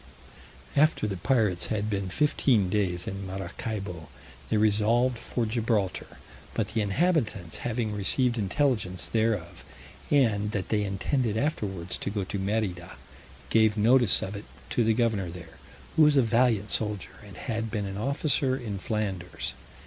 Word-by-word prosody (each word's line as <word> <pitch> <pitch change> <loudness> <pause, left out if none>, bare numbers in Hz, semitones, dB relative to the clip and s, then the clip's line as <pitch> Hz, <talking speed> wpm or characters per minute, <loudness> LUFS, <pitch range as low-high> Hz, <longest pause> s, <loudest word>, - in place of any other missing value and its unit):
After 155 -4 +3
the 100 -2 -2
pirates 105 -5 +1
had 105 -1 -1
been 100 -3 -2
fifteen 115 -4 +2
days 90 -4 0
in 100 0 -5
Maracaibo, 95 -2 -5 0.4
they - - +2
resolved 110 +4 +2
for 120 0 -2
Gibraltar; 110 -3 -1 0.4
but 110 -3 -1
the 110 0 -1
inhabitants 110 - 0
having 115 -2 -2
received 120 +4 +2
intelligence 100 - 0
thereof, 110 -4 -1 0.5
and 110 -7 +2
that 95 -3 -3
they 105 -1 +1
intended 110 +4 -1
afterwards 100 - -2
to - - -2
go 100 -1 -2
to 95 +2 -4
Merida, 95 -3 -2 0.5
gave 110 -1 +4
notice 120 0 +5
of 100 - -5
it 100 - -7 0.3
to 120 - +2
the 110 0 +2
governor 110 -6 +1
there, 85 -1 -11 0.4
who - - +4
was 150 -1 +6
a 135 - +6
valiant 115 -2 +2
soldier, 105 -3 -2
and 100 -3 -12
had 115 +2 -3
been 105 -2 -2
an 95 0 -5
officer 140 +2 +1
in 105 -6 -5
Flanders. 95 -6 -3
105 Hz, 150 wpm, -27 LUFS, 95-120 Hz, 0.5 s, was